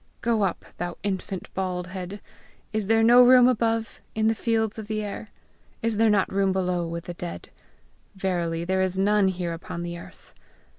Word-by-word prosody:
Go 230 Hz, -2 st, +1 dB
up, 190 Hz, -4 st, -1 dB
thou 175 Hz, 0 st, -3 dB
infant 190 Hz, -1 st, -4 dB
bald 185 Hz, -2 st, -2 dB
head! 185 Hz, +2 st, -7 dB, 0.5 s
Is 215 Hz, -2 st, -1 dB
there 225 Hz, +1 st, +4 dB
not 245 Hz, +2 st, +8 dB
room 250 Hz, -1 st, +8 dB
above, 225 Hz, -2 st, 0 dB
in 220 Hz, 0 st, +1 dB
the 225 Hz, -, +4 dB
fields 220 Hz, -1 st, 0 dB
of 215 Hz, -, -7 dB
the 215 Hz, 0 st, -2 dB
air? 205 Hz, +1 st, -6 dB, 0.5 s
Is 230 Hz, -2 st, +1 dB
there 225 Hz, 0 st, +4 dB
not 205 Hz, -3 st, +2 dB
room 195 Hz, 0 st, +2 dB
below 180 Hz, -2 st, 0 dB
with 170 Hz, 0 st, -5 dB
the 175 Hz, -, -6 dB
dead? 175 Hz, 0 st, -7 dB, 0.7 s
Verily 170 Hz, -3 st, -1 dB
there 190 Hz, +1 st, +1 dB
is 185 Hz, 0 st, 0 dB
none 205 Hz, +1 st, +3 dB
here 180 Hz, -2 st, -2 dB
upon 170 Hz, +1 st, -6 dB
the 170 Hz, 0 st, -5 dB
earth!' -, -, -15 dB
195 Hz, 185 wpm, -25 LUFS, 180-220 Hz, 0.7 s, not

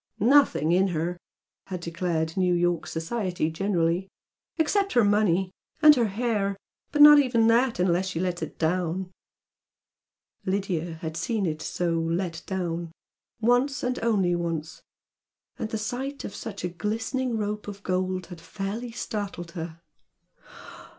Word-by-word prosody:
"Nothing 235 Hz, -, +4 dB
in 185 Hz, +3 st, +4 dB
her!" 175 Hz, 0 st, -2 dB, 0.5 s
had 185 Hz, -2 st, -5 dB
declared 170 Hz, -1 st, -2 dB
New 180 Hz, -2 st, +2 dB
York 175 Hz, -1 st, +1 dB
society 175 Hz, -1 st, -2 dB
generally 175 Hz, 0 st, 0 dB, 0.5 s
"Except 395 Hz, +5 st, +1 dB
her 240 Hz, -, +5 dB
money! 200 Hz, -3 st, +2 dB, 0.3 s
And 305 Hz, -1 st, +9 dB
her 235 Hz, -4 st, +2 dB
hair 205 Hz, -2 st, -1 dB, 0.3 s
but 295 Hz, 0 st, +6 dB
not 295 Hz, 0 st, +10 dB
even 240 Hz, -5 st, +3 dB
that 235 Hz, +1 st, +3 dB
unless 180 Hz, +1 st, +2 dB
she 180 Hz, -3 st, -3 dB
lets 180 Hz, -1 st, -2 dB
it -, -, -6 dB
down!" 180 Hz, +2 st, -1 dB, 1.3 s
Lydia 185 Hz, -4 st, -2 dB
had 160 Hz, -1 st, -4 dB
seen 215 Hz, +3 st, -1 dB
it 155 Hz, -2 st, -2 dB
so 170 Hz, -2 st, -1 dB
"let 165 Hz, 0 st, -2 dB
down," 175 Hz, -3 st, -3 dB, 0.5 s
once, 245 Hz, +4 st, +2 dB
and 250 Hz, 0 st, -1 dB
only 200 Hz, -6 st, +2 dB
once, 165 Hz, -2 st, -3 dB, 0.8 s
and 220 Hz, -, -3 dB
the 220 Hz, -, -2 dB
sight 255 Hz, +6 st, -4 dB
of -, -, -6 dB
such 210 Hz, -6 st, -7 dB
a 180 Hz, -, -1 dB
glistening 225 Hz, +6 st, -2 dB
rope 210 Hz, 0 st, -3 dB
of 200 Hz, -1 st, -8 dB
gold 185 Hz, 0 st, -1 dB
had 175 Hz, -1 st, -11 dB
fairly 200 Hz, +7 st, -5 dB
startled 200 Hz, -6 st, -5 dB
her. 165 Hz, -1 st, -7 dB
190 Hz, 140 wpm, -26 LUFS, 170-225 Hz, 1.3 s, not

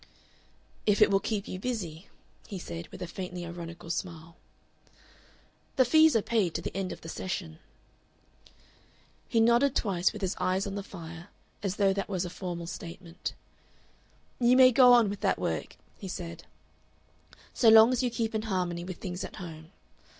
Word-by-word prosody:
"If 210 Hz, -1 st, +4 dB
it 210 Hz, -1 st, +6 dB
will 195 Hz, -, +4 dB
keep 210 Hz, -1 st, -3 dB
you 185 Hz, -, -5 dB
busy," 190 Hz, -7 st, -4 dB, 0.4 s
he 200 Hz, -, -6 dB
said, 85 Hz, -, -7 dB
with -, -, -8 dB
a -, -, -5 dB
faintly 180 Hz, 0 st, -6 dB
ironical 170 Hz, -1 st, -7 dB
smile. 165 Hz, -1 st, -5 dB, 1.4 s
"The 260 Hz, -, +5 dB
fees 315 Hz, +3 st, +5 dB
are 220 Hz, -, +3 dB
paid 205 Hz, -8 st, 0 dB
to 170 Hz, -, -1 dB
the -, -, -5 dB
end 190 Hz, -1 st, -2 dB
of -, -, -8 dB
the -, -, -10 dB
session." 165 Hz, -2 st, -5 dB, 1.7 s
He 230 Hz, -, +2 dB
nodded 235 Hz, +4 st, +4 dB
twice, 185 Hz, -4 st, +1 dB
with 210 Hz, -2 st, -8 dB
his 190 Hz, -, -1 dB
eyes 185 Hz, +1 st, 0 dB
on 200 Hz, -, -4 dB
the 200 Hz, -, -3 dB
fire, 170 Hz, -2 st, -10 dB, 0.3 s
as 195 Hz, -2 st, -2 dB
though 195 Hz, -2 st, +3 dB
that 195 Hz, +1 st, -3 dB
was 185 Hz, -2 st, -1 dB
a 175 Hz, -, -6 dB
formal 175 Hz, -2 st, -5 dB
statement. 170 Hz, 0 st, -7 dB, 1.0 s
"You 245 Hz, +1 st, +5 dB
may 255 Hz, -1 st, +8 dB
go 250 Hz, 0 st, +7 dB
on 240 Hz, -3 st, +6 dB
with 200 Hz, 0 st, -4 dB
that -, -, +1 dB
work," -, -, -3 dB, 0.2 s
he 195 Hz, -, -7 dB
said, 170 Hz, -2 st, -7 dB, 1.1 s
"so 230 Hz, -, +5 dB
long 220 Hz, +2 st, +8 dB
as 255 Hz, -, +1 dB
you 250 Hz, -, +1 dB
keep 230 Hz, -1 st, -2 dB
in 220 Hz, -, 0 dB
harmony 175 Hz, -3 st, -1 dB
with 180 Hz, 0 st, -7 dB
things 180 Hz, 0 st, -5 dB
at -, -, -7 dB
home. 160 Hz, -2 st, -9 dB
190 Hz, 175 wpm, -29 LUFS, 170-220 Hz, 1.7 s, may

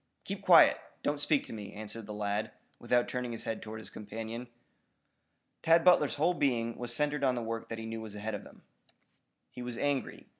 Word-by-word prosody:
"Keep -, -, -5 dB
quiet. -, -, +7 dB, 0.2 s
Don't 145 Hz, 0 st, 0 dB
speak 145 Hz, -1 st, +2 dB
to -, -, -9 dB
me," 105 Hz, -2 st, -7 dB
answered 105 Hz, +1 st, -6 dB
the -, -, -6 dB
lad, 105 Hz, 0 st, -1 dB, 0.3 s
without 120 Hz, -1 st, +2 dB
turning 125 Hz, -1 st, -3 dB
his 115 Hz, -, -5 dB
head 115 Hz, -, -3 dB
toward 110 Hz, 0 st, -7 dB
his 110 Hz, -, -10 dB
companion. 115 Hz, +3 st, -6 dB, 1.1 s
Tad 165 Hz, +1 st, +5 dB
Butler's 175 Hz, -5 st, +5 dB
whole 160 Hz, +5 st, +3 dB
being 120 Hz, -7 st, 0 dB
was 120 Hz, -1 st, -3 dB
centered 150 Hz, +2 st, 0 dB
on 130 Hz, -2 st, +3 dB
the 120 Hz, -, -2 dB
work 115 Hz, 0 st, -4 dB
that 115 Hz, -, -4 dB
he 115 Hz, -, -6 dB
knew 115 Hz, 0 st, -5 dB
was 110 Hz, -2 st, -8 dB
ahead 105 Hz, +1 st, -4 dB
of 105 Hz, -, -3 dB
him. -, -, -16 dB, 0.9 s
He 125 Hz, -, -8 dB
was 120 Hz, -1 st, -5 dB
angry. 145 Hz, -1 st, -1 dB
115 Hz, 200 wpm, -31 LUFS, 110-135 Hz, 1.1 s, quiet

